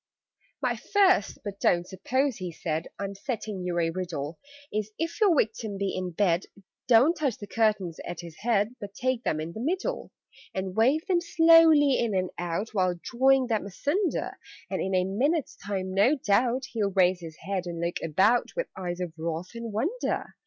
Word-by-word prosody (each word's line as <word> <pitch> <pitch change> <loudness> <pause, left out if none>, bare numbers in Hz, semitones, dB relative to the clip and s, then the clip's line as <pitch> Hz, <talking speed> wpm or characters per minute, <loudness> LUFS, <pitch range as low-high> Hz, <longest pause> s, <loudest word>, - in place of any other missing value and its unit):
"My - - +1
First 380 - +3
but 200 -1 -6
don't 175 0 +2
suppose," 260 +6 -1
he 180 -2 -5
said, 160 0 -3
"I'm 200 0 -4
setting 210 -2 -4
you 180 -1 -2
a 165 -1 +1
riddle 165 -4 -4 0.3
Is 215 0 -1
if 330 +7 -3
your 380 -7 +5
Victim 220 -3 -1
be 195 0 -2
in 185 -1 -2
bed, 175 0 +1 0.4
Don't 255 +8 +6
touch 285 -8 -1
the 205 - -8
curtains 205 -6 0
at 175 0 -6
his 170 -2 -11
head, 220 0 +1
But 200 -1 -8
take 255 -2 -1
them 155 - 0
in 160 +2 -5
the - - -7
middle, 375 - -2 0.4
"And 190 -1 -3
wave 265 +8 +3
them 355 -2 +2
slowly 325 -4 +6
in 225 -4 0
and 185 -1 0
out, 175 +5 -2
While 185 -3 +1
drawing 265 +1 +3
them 220 -4 -1
asunder; 305 - -1 0.3
And - - -1
in 190 0 -1
a 185 - +3
minute's 270 - 0
time, 190 -2 -4
no 210 +10 +4
doubt, 245 +1 +1
He'll 210 -4 0
raise 185 -1 +3
his 165 -2 -9
head 185 0 -3
and 170 -1 -5
look 170 +1 -1
about 190 +10 +2
With - - -2
eyes 180 -1 -4
of 175 -3 -4
wrath 165 +4 -4
and 230 -1 -6
wonder. 325 - -2
205 Hz, 185 wpm, -27 LUFS, 180-260 Hz, 0.4 s, Don't